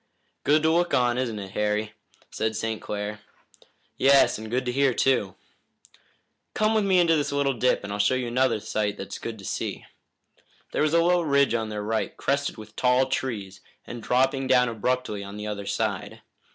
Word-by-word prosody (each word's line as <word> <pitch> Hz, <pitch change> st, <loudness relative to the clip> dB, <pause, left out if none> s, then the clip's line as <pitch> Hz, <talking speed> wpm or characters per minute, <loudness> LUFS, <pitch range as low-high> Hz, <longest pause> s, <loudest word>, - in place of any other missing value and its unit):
"Good 150 Hz, +2 st, +3 dB
to 160 Hz, -, +4 dB
look 175 Hz, +1 st, +2 dB
on, 125 Hz, 0 st, +2 dB
isn't 120 Hz, -4 st, -2 dB
it, 100 Hz, -2 st, -7 dB
Harry?" 105 Hz, +1 st, -1 dB, 0.4 s
said 110 Hz, 0 st, -2 dB
St. 110 Hz, 0 st, -3 dB
Clair. 105 Hz, 0 st, -4 dB, 0.8 s
"Yes, 135 Hz, -4 st, +4 dB
and 110 Hz, 0 st, -7 dB
good 125 Hz, +3 st, -1 dB
to 125 Hz, -, -1 dB
hear, 135 Hz, -1 st, +2 dB
too." 105 Hz, -8 st, +1 dB, 1.2 s
"Come 215 Hz, +1 st, +2 dB
with 215 Hz, -1 st, +2 dB
me 190 Hz, -2 st, +3 dB
into 170 Hz, -2 st, +4 dB
this 145 Hz, -2 st, -1 dB
little 140 Hz, -1 st, +1 dB
dip, 125 Hz, -1 st, +1 dB
and 100 Hz, 0 st, -5 dB
I'll 105 Hz, -, -4 dB
show 105 Hz, +5 st, +3 dB
you 130 Hz, -1 st, -1 dB
another 125 Hz, -2 st, +1 dB
sight 105 Hz, 0 st, -2 dB
that's 95 Hz, -, -7 dB
good 115 Hz, -1 st, -6 dB
to 100 Hz, -, -11 dB
see." -, -, -4 dB, 0.9 s
There -, -, -1 dB
was 155 Hz, +2 st, +2 dB
a 170 Hz, -, +5 dB
low 175 Hz, 0 st, +3 dB
ridge 140 Hz, -5 st, +2 dB
on 110 Hz, -2 st, -1 dB
their 105 Hz, -1 st, -4 dB
right, 110 Hz, +1 st, -2 dB
crested 140 Hz, -1 st, -1 dB
with 110 Hz, 0 st, -12 dB
tall 125 Hz, +1 st, +2 dB
trees 100 Hz, -8 st, -3 dB, 0.2 s
and 120 Hz, -1 st, -7 dB
dropping 130 Hz, +3 st, +1 dB
down 125 Hz, -2 st, +4 dB
abruptly 115 Hz, -2 st, -2 dB
on 100 Hz, +1 st, -8 dB
the 105 Hz, -, -6 dB
other 100 Hz, -1 st, -5 dB
side. -, -, -3 dB
125 Hz, 190 wpm, -25 LUFS, 105-140 Hz, 1.2 s, a